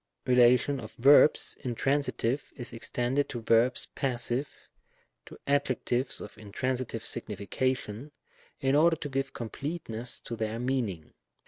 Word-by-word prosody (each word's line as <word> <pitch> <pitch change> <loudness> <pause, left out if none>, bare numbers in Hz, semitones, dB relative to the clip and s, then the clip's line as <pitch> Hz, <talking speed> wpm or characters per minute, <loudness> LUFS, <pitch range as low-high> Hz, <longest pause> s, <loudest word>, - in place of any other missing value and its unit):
relation 125 +3 +4
of 110 -3 -9
verbs 140 +4 +5
intransitive 135 0 -1
is 120 -1 -5
ex 115 -1 -5
tended 130 +4 0
to 120 - -4
verbs 115 +2 +3
passive, 125 +1 -1 0.8
to - - -11
adjectives 130 -2 0
of 105 - -10
intransitive 115 +2 -3
signification, 120 +4 -2 0.5
in 135 -1 +1
order 165 +3 +5
to 150 - -6
give 135 0 -2
completeness 125 -1 -5
to 115 - -6
their 110 0 -3
meaning. 115 -10 -2
125 Hz, 120 wpm, -29 LUFS, 115-135 Hz, 0.8 s, verbs